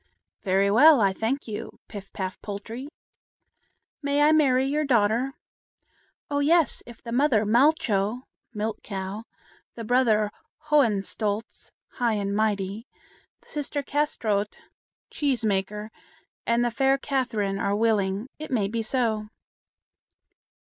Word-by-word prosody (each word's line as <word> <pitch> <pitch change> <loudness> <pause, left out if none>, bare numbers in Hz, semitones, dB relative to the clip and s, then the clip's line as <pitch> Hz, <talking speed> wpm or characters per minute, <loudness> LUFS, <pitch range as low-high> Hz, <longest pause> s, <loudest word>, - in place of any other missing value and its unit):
"Very 195 +1 +2
well, 290 +6 +7
I 195 -3 +3
thank 235 +8 -2
you, 210 -2 -6
Pif 195 -2 -9
paf 185 -1 -5
Poltrie." 225 +6 -7 1.1
"May 285 0 +2
I 300 - +6
marry 265 -4 +4
your 295 +3 0
daughter?" 240 0 +1 0.9
"Oh, 285 0 -1
yes! 315 0 +3
if 240 -2 -13
the 235 - -7
mother 245 -4 +3
Malcho 235 -2 +2 0.3
(Milk 215 -1 -3
Cow), 195 +2 -5 0.5
the 230 - -6
brother 220 -3 +2 0.4
Hohenstolz 215 -4 0 0.3
(High 235 -3 +2
and 200 -1 -2
Mighty), 210 +1 -1 0.6
the - - -22
sister 290 -1 -3
Kâsetraut 225 -9 -1 0.6
(Cheese 265 -6 -1
maker), 210 +1 -1 0.6
and 235 +1 +2
the 240 - 0
fair 270 +3 +2
Catherine 230 -8 -1
are 200 0 0
willing, 210 -1 +1
it 310 - -7
may 220 -6 +1
be 225 +3 -2
so." 220 -2 -1
225 Hz, 120 wpm, -25 LUFS, 205-270 Hz, 1.1 s, well